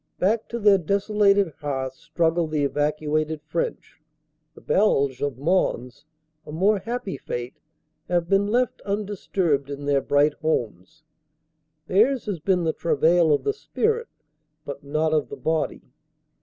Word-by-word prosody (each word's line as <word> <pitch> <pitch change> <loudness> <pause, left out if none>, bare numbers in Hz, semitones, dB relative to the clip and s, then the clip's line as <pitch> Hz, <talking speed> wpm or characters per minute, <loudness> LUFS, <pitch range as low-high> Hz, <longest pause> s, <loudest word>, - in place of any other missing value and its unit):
Back 215 +4 +1
to 235 - -3
their 205 -3 +5
desolated 200 0 +2
hearths 135 -3 -4
struggle 165 +1 0
the 155 -2 -1
evacuated 150 +2 -1
French; 160 0 -4 0.5
the - - -13
Beiges 140 -10 +2
of 145 -4 -2
Mons, 145 -5 -1 0.4
a - - -10
more 195 +6 +2
happy 230 - -4
fate, 120 -1 -6 0.5
have 175 -1 +1
been 195 +2 +2
left 245 +3 0
undisturbed 195 -8 -1
in 140 0 -6
their 140 -1 +2
bright 145 +2 +3
homes 155 - -3 0.8
theirs 230 +9 +2
has 200 -6 -3
been 180 +2 +1
the 160 -1 0
travail 165 +1 +3
of 145 - +2
the 420 - 0
spirit 450 +2 -1 0.6
but 140 0 -7
not 155 +2 0
of 150 -2 +1
the - - -7
body. 160 -1 -2
160 Hz, 140 wpm, -24 LUFS, 145-200 Hz, 0.8 s, their